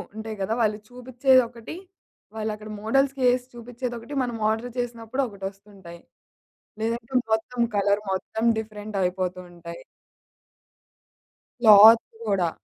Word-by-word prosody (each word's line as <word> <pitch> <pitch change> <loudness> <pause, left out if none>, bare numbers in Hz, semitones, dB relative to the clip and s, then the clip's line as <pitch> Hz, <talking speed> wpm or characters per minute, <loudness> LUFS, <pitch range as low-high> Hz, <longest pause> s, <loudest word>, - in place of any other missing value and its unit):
ఉంటాయి 220 0 -6
గదా! 205 +3 -1
వాళ్ళు 210 -2 +1
చూపిచ్చేయి 255 +1 +2
ఒకటి, 235 +4 -10 0.6
వాళ్ళక్కడ 215 -1 -5
మోడల్స్‌కి 270 +4 +1
ఏసి 250 0 -1
చూపిచ్చేది 240 +1 -6
ఒకటి, 235 +6 -10
మనం 240 -2 -3
ఆర్డర్ 225 +3 -2
చేసినప్పుడు 240 +2 -3
ఒకటొస్తుంటాయి. 195 -3 -10 0.8
లేదంటే 230 +2 -3 0.2
మొత్తం 230 +2 -2
కలర్ 200 +1 +2
మొత్తం 205 +4 -3
డిఫరెంట్ 215 -1 -6
అయిపోతూ 180 0 -2
ఉంటాయి. 170 -1 -10 1.8
క్లాత్ 220 0 +9 0.2
గూడా 195 -5 +1
220 Hz, 110 wpm, -24 LUFS, 200-240 Hz, 1.8 s, క్లాత్